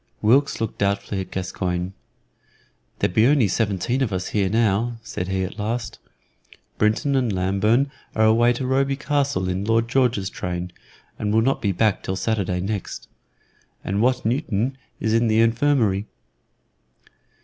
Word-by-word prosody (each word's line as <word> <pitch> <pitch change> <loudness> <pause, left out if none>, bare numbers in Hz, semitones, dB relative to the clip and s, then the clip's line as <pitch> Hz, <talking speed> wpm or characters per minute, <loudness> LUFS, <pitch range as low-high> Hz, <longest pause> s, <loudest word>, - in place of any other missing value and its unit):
Wilkes 135 +6 +3
looked 115 -2 -3
doubtfully 100 0 -1
at 95 - -7
Gascoyne. 90 -1 -3 1.0
"There - - +1
be 110 +6 +4
only 140 -6 +4
seventeen 110 +5 0
of 125 -5 0
us 95 -1 -3
here 100 -3 +1
now," 115 +2 +1
said 90 - -4
he 95 0 -1
at 95 +4 -6
last. 115 +3 -3 0.8
"Brinton 110 +7 +2
and 125 -4 +1
Lambourne 100 +8 +1 0.2
are 110 - +3
away 115 +2 +4
to 130 +2 -4
Roby 135 +1 +1
Castle 140 -9 0
in 90 +1 -2
Lord 115 +2 +2
George's 120 -6 +1
train, 90 0 -4 0.5
and 105 - -1
will 110 +1 +3
not 135 +3 +1
be 100 - +1
back 105 +2 +1
till 95 - -3
Saturday 95 -3 -1
next. 100 0 -4 0.8
And 100 +2 -1
Watt 125 0 +1
Newton 120 0 0 0.2
is 110 - 0
in 115 +1 +3
the 110 0 +3
infirmary. 115 -4 +2
110 Hz, 150 wpm, -23 LUFS, 95-120 Hz, 1.0 s, be